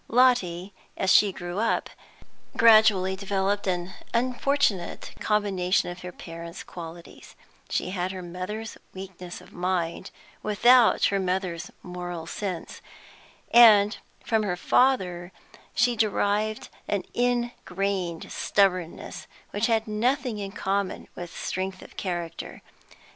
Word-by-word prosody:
Lotty, 200 -7 +2 0.2
as 190 - +3
she 205 -2 +6
grew 175 +1 -5
up, 230 +1 +1 0.7
gradually 215 -4 +6
developed 200 +1 -1
an 180 0 -1 0.2
unfortunate 250 -5 0
combination 195 -4 +1
of 175 0 -9
her 180 - -6
parents' 170 0 -9
qualities; 170 -1 -10 0.3
she 180 - -1
had 185 -1 -2
her 185 -1 -6
mother's 185 +6 -6 0.2
weakness 185 -2 -8
of - - -17
mind, 175 -2 -2 0.3
without 235 +3 +5
her 195 - +2
mother's 185 -2 -2
moral 175 -2 -6
sense, 185 0 -5 0.7
and 215 -3 +7 0.3
from 220 -2 +2
her 185 -4 -1
father 180 -7 +2 0.4
she 245 0 +3
derived 215 0 0 0.2
an 200 -3 -1
ingrained 200 -8 -1
stubbornness, 185 -4 0 0.2
which 205 +2 0
had 225 -1 +1
nothing 235 +2 0
in 195 -1 -5
common 195 0 -2
with 175 -1 -7
strength 185 0 -4
of - - -15
character. 175 -3 -5
195 Hz, 115 wpm, -26 LUFS, 180-215 Hz, 0.7 s, and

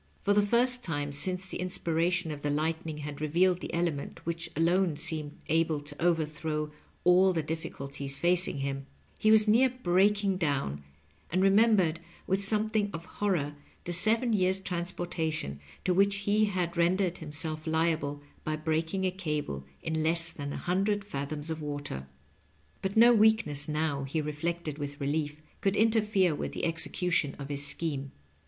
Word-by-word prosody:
For 205 - +3
the 205 - +5
first 245 +4 +2
time 145 -4 -3
since 185 +5 -1
the 190 - -6
inspiration 175 -2 0
of 145 -1 -6
the 145 - -1
lightning 160 +1 -2
had 150 0 -7
revealed 175 +4 +2
the - - -5
element 170 -4 -2
which 165 0 -3
alone 170 0 +2
seemed 155 -1 -1
able 160 -1 +1
to 145 +2 -8
overthrow 155 -2 0 0.3
all 185 +1 +5
the 165 -2 -1
difficulties 140 -3 -4
facing 175 -4 +2
him, 135 0 -3 0.3
he 215 - +3
was 215 0 +6
near 240 +5 +5
breaking 200 -3 +2
down, 140 - -1 0.5
and 185 +3 +1
remembered 195 -5 +4 0.3
with 195 +1 0
something 215 0 +2
of 165 +1 -6
horror 175 -8 -1 0.3
the 175 - -3
seven 225 +6 +4
years' 190 -1 +2
transportation 170 - -3 0.2
to 180 - +2
which 200 +2 +3
he 210 +1 +3
had 180 -4 -2
rendered 180 +1 +1
himself 155 0 -4
liable 160 -3 0 0.2
by 155 - -1
breaking 160 +4 -1
a 185 - +1
cable 150 - -4 0.2
in 160 0 -1
less 165 +1 +2
than 145 -1 -6
a - - -4
hundred 200 +3 0
fathoms 145 -1 -2
of 160 0 -4
water. 145 - -5 0.7
But 195 +2 -2
no 235 +2 +8
weakness 215 -10 +3
now, 150 -2 -1
he 140 +4 -2
reflected 155 +1 -3
with 145 0 -5
relief, 150 +1 -2 0.2
could 195 0 +1
interfere 210 -5 +3
with 145 - -4
the - - -2
execution 165 -2 +1
of 140 0 -7
his 140 0 -1
scheme. 140 -5 -2
165 Hz, 160 wpm, -29 LUFS, 150-190 Hz, 0.7 s, no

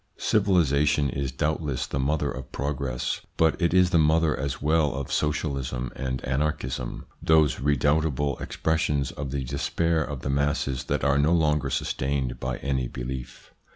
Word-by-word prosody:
Civilisation 75 -6 +2
is 70 0 -2
doubtless 75 0 -1
the 70 - -3
mother 75 +3 0
of 65 0 -8
progress, 65 -2 -2 0.2
but 80 +2 +2
it 85 - +3
is 90 0 +4
the 85 - +4
mother 80 0 +3
as 70 0 -3
well 75 -1 +2
of 70 -2 -4
Socialism 70 -5 -1
and 65 -1 -3
Anarchism, 65 -3 -2 0.2
those 80 -5 +4
redoubtable 75 0 +1
expressions 75 -4 0
of 70 -3 -5
the 70 0 -2
despair 80 +5 0
of 70 -3 -6
the - - -3
masses 70 -2 0
that - - -1
are 70 +1 +3
no 75 +4 +3
longer 75 -4 +2
sustained 65 -1 -1
by 65 0 -3
any 65 -2 -1
belief. 60 +1 -7
70 Hz, 155 wpm, -26 LUFS, 65-75 Hz, 0.2 s, is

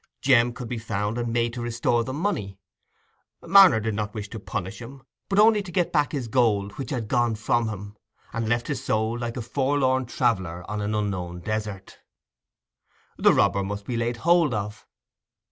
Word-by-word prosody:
Jem 120 -3 +5
could 120 0 -7
be 120 0 -4
found 105 +1 -2
and 120 -1 -2
made 115 0 0
to 120 - -5
restore 120 0 0
the 130 - -5
money: 130 - -2 0.9
Marner 190 - +7
did 110 0 -2
not 105 0 -3
want 105 -1 -6
to 115 - -6
punish 95 +1 -5
him, 130 +2 -10 0.3
but 195 - 0
only 215 0 +6
to 190 -3 -9
get 175 -1 0
back 150 -2 +2
his 135 -6 -3
gold 110 -5 +1
which 135 - -4
had 120 -6 -3
gone 120 -1 +1
from 115 +1 0
him, 100 0 -7 0.4
and 115 -1 -2
left 120 0 +1
his - - -4
soul 110 +1 0
like 120 0 -4
a 120 - -3
forlorn 130 0 +1
traveller 95 -9 -1
on 105 0 -3
an 105 +1 -2
unknown 90 -4 -3
desert. 105 -1 -5 1.2
The - - +5
robber 100 - +3
must 100 +1 -5
be 125 - -3
laid 120 +1 -1
hold 165 -2 +3
of. 105 +1 -5
115 Hz, 185 wpm, -25 LUFS, 105-130 Hz, 1.2 s, Marner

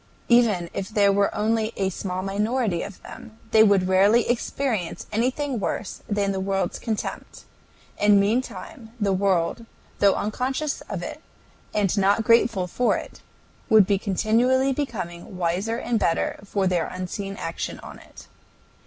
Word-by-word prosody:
Even 225 -8 +4
if 195 0 -4
there 205 -2 +3
were 200 0 +2
only 220 +1 0
a 195 -1 0
small 185 0 -4
minority 210 -1 0
of 205 - -7
them, 220 - -11
they 220 - +6
would 200 -4 +4
rarely 200 +5 +4
experience 235 -5 -2
anything 255 +3 -1
worse 200 0 -4
than 205 -1 0
the 190 - -2
world's 190 -1 -1
contempt, 220 -3 -5 0.6
and 205 -1 +5
meantime 225 +3 -2
the 200 -2 +1
world, 190 +3 0 0.3
though 200 -1 +5
unconscious 260 +7 -2
of - - -4
it, - - -7 0.5
and 205 -3 +1
not 200 +3 +3
grateful 230 -4 +3
for 240 +7 +1
it, - - -9 0.5
would 215 -3 +7
be 200 0 +1
continually 235 +7 +2
becoming 190 - -5
wiser 185 +6 -1
and 240 -2 -1
better 165 - 0
for 200 -1 -1
their 180 -3 +1
unseen 195 +2 -5
action 165 - -5
on - - -10
it. - - -15
205 Hz, 145 wpm, -24 LUFS, 190-230 Hz, 0.6 s, would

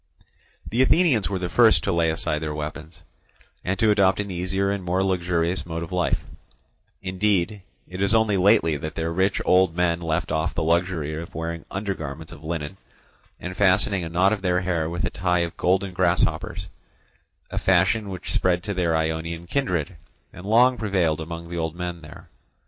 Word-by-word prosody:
The 120 +4 +1
Athenians 130 - +3
were 100 - -1
the 90 -1 -3
first 115 +4 +4
to 100 - 0
lay 85 -2 +2
aside 80 -1 -1
their 75 -1 -4
weapons, 75 +2 -7 0.6
and 95 +1 -1
to 110 +1 +3
adopt 95 -2 +3
an 100 -1 -3
easier 95 +2 -1
and 100 -2 -3
more 90 +2 0
luxurious 90 -1 0
mode 85 0 -5
of 85 - -8
life; 90 -2 0 0.8
indeed, 95 +1 0 0.3
it 90 +1 -7
is 100 +3 +3
only 110 -2 +3
lately 95 -5 +4
that 80 +2 -6
their 80 0 -2
rich 95 +3 +1
old 90 -2 +4
men 85 -1 +1
left 80 -2 -1
off 80 0 -1
the 85 - 0
luxury 85 -2 0
of 80 +2 -7
wearing 85 +1 -4
undergarments 95 -8 -5
of 75 - -12
linen, 80 +2 -4 0.6
and 90 +1 -6
fastening 95 0 +3
a 80 - -5
knot 90 +4 +3
of 105 - -3
their 90 -1 +1
hair 85 -3 -1
with 85 -1 -2
a - - -2
tie 90 -1 +1
of 85 -1 -3
golden 95 +1 +1
grasshoppers, 90 0 0 0.9
a - - -2
fashion 95 +3 +2
which 95 -1 -6
spread 90 -1 +1
to 100 - -3
their 85 -3 +1
Ionian 80 +1 -2
kindred 90 - -1 0.4
and 90 +2 -10
long 125 +4 +4
prevailed 90 -7 0
among 85 +1 -6
the 85 0 -6
old 80 0 -2
men 90 -1 -5
there. 75 -1 -13
90 Hz, 185 wpm, -24 LUFS, 85-95 Hz, 0.9 s, first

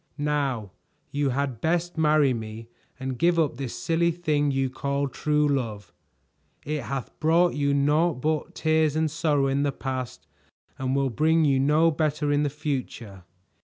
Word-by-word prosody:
"Now 140 -8 -1 0.4
you 145 -1 0
had 130 -3 -2
best 175 +2 0
marry 150 -4 +3
me 110 0 -7 0.3
and 130 -2 -4
give 170 0 +3
up 150 -7 +1
this 135 -3 -5
silly 170 +1 +1
thing 155 -4 0
you 135 -1 0
call 140 +2 -2
true 150 +2 +1
love. 110 -9 -3 0.7
It 150 0 -2
hath 130 +2 -5
brought 165 +3 +3
you 140 -1 0
naught 150 +4 +2
but 155 +3 -2
tears 155 -1 +2
and 155 -1 +1
sorrow 150 -3 +1
in 135 +1 +1
the 145 -1 +1
past 130 - -5 0.5
and 130 0 -1
will 135 -1 +1
bring 160 +5 +3
you 135 -2 +3
no 150 +4 +4
better 150 -1 0
in 145 0 +2
the 145 - +1
future." 130 - -5
145 Hz, 165 wpm, -25 LUFS, 130-155 Hz, 0.7 s, no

